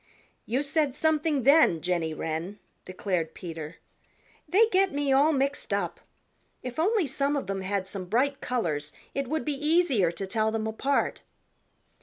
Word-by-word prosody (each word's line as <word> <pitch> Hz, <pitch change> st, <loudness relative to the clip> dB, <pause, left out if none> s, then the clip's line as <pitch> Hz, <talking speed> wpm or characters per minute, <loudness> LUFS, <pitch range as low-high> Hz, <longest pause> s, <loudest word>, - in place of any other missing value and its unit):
"You 255 Hz, +5 st, 0 dB
said 290 Hz, -2 st, 0 dB
something 305 Hz, -2 st, +1 dB
then, 280 Hz, -, +5 dB
Jenny 170 Hz, -1 st, -1 dB
Wren," 160 Hz, +5 st, -4 dB, 0.3 s
declared 185 Hz, -3 st, -2 dB
Peter. 165 Hz, -2 st, -7 dB, 0.7 s
"They 420 Hz, +5 st, +6 dB
get 385 Hz, -1 st, +3 dB
me 285 Hz, -1 st, 0 dB
all 285 Hz, +4 st, +5 dB
mixed 275 Hz, -1 st, -1 dB
up. -, -, -1 dB, 0.6 s
If 250 Hz, +3 st, -5 dB
only 400 Hz, +2 st, +2 dB
some 280 Hz, +2 st, 0 dB
of 280 Hz, -, -2 dB
them 195 Hz, -1 st, -3 dB
had 190 Hz, 0 st, -2 dB
some 195 Hz, -1 st, -6 dB
bright 265 Hz, +8 st, 0 dB
colors 155 Hz, -12 st, -2 dB, 0.2 s
it 275 Hz, -1 st, -2 dB
would 315 Hz, +4 st, -2 dB
be 300 Hz, -, 0 dB
easier 300 Hz, -, +2 dB
to 185 Hz, +3 st, -5 dB
tell 215 Hz, +2 st, 0 dB
them 220 Hz, 0 st, -2 dB
apart." 265 Hz, +6 st, 0 dB
255 Hz, 155 wpm, -27 LUFS, 185-295 Hz, 0.7 s, They